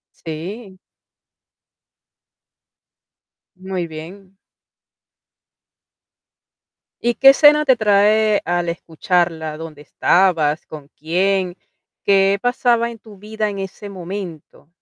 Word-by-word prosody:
Sí. 185 +5 -8 2.8
Muy 185 -2 -4
bien. 185 +5 -11 2.6
¿Y 240 0 +1
qué 270 +3 +6
escena 300 +2 +6
te 265 -3 +4
trae 210 0 +3
al 175 0 -1
escucharla? 165 -1 -2
¿Dónde 155 -2 -10
estabas? 160 -2 +1
¿Con 150 -3 -11
quién? 180 +3 0 0.5
¿Qué 195 0 +3
pasaba 245 -1 +1
en 235 - -10
tu 215 -2 -16
vida 215 +1 -3
en 200 -1 -6
ese 195 +2 -7
momento? 180 -5 -8
195 Hz, 90 wpm, -19 LUFS, 170-215 Hz, 2.8 s, qué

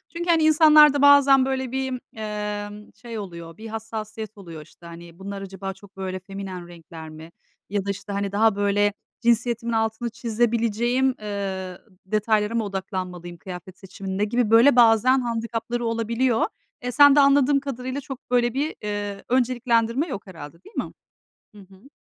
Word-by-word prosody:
Çünkü 345 +1 -4
hani 330 -2 +4
insanlarda 305 -2 +6
bazen 280 -2 +6
böyle 265 -2 -2
bir, 265 -1 -2 0.2
emm, 210 -1 -5
şey 230 -2 -8
oluyor, 170 -4 -9
bir 225 +1 -9
hassasiyet 220 -1 -7
oluyor, 170 -5 -10
işte. 160 +3 -18
Hani 170 +1 -12
bunlar 200 0 -6
acaba 195 0 -6
çok 195 0 -19
böyle 185 -1 -4
feminen 190 -2 -8
renkler 165 -2 -11
mi 160 +2 -12 0.4
ya 200 -1 -2
da, - - -4
işte, 200 +1 -5
hani 200 0 -2
daha 215 0 +3
böyle 205 0 +1 0.3
cinsiyetimin 235 0 +1
altını 225 +1 -1
çizebileceğim, 235 +2 0
eee, 190 -3 -4 0.3
detaylara 215 +2 0
mı 230 - +1
odaklanmalıyım 185 -3 -5
kıyafet 185 +1 -10
seçiminde? 195 +1 -5
Gibi 235 0 0
böyle 240 +4 +6
bazen 240 +2 +5
handikapları 230 0 -3
olabiliyor. 230 +1 +1 0.4
Eee, 250 - -2
sende 285 +1 +7
anladığım 280 0 +4
kadarıyla 265 0 -5
çok 270 0 -8
böyle 240 -1 +2
bir, 290 +4 -2
ııı, 205 -1 -4
önceliklendirme 245 +2 +1
yok 205 - -6
herhâlde, 160 -3 -10
değil - - -17
mi? - - -3 0.6
Hı - - -13
hı. 195 +6 -17
220 Hz, 155 wpm, -23 LUFS, 195-245 Hz, 0.6 s, sende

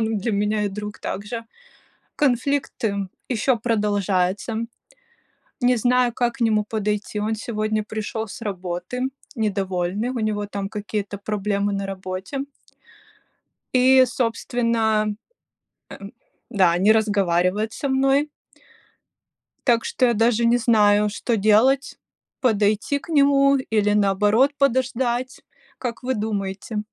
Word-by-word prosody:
он 220 -1 0
для 215 +3 -2
меня 210 +1 0
и - - 0
друг 210 +1 -7
также. 210 +4 -5 0.7
Конфликты 245 -7 0 0.2
еще 250 +1 +1
продолжаются. 205 -2 0 1.0
Не 250 0 +3
знаю, 245 +1 +2
как 240 0 0
к 270 - -15
нему 215 -2 +2
подойти. 210 -1 -2
Он 215 +1 -1
сегодня 215 -1 -2
пришел 220 +1 -4
с 205 - -10
работы 185 +3 -4 0.3
недовольный, 195 -1 -1
у 255 - -3
него 210 -2 -1
там 200 -1 -4
какие-то 205 -1 -4
проблемы 205 0 -1
на 195 0 -2
работе. 190 +5 -5 1.4
И, 260 +1 +6
собственно, 230 -2 0
м 210 -1 -3 1.3
Да, 185 -7 +3
не 200 +4 +5
разговаривает 205 -1 +1
со 280 - -3
мной 270 +2 +2 1.4
так 235 -3 +3
что 255 - +1
я 240 - +2
даже 230 +1 +2
не 235 +1 +4
знаю, 210 -3 +3
что 225 +2 -1
делать: 225 +7 +3 0.4
подойти 215 +3 +1
к 335 - -15
нему 280 -2 +4
или 215 -5 +1
наоборот 210 +6 +3
подождать? 255 -2 0 0.4
Как 245 -1 -5
вы 260 +1 -1
думаете? 210 0 -3
215 Hz, 120 wpm, -22 LUFS, 205-245 Hz, 1.4 s, И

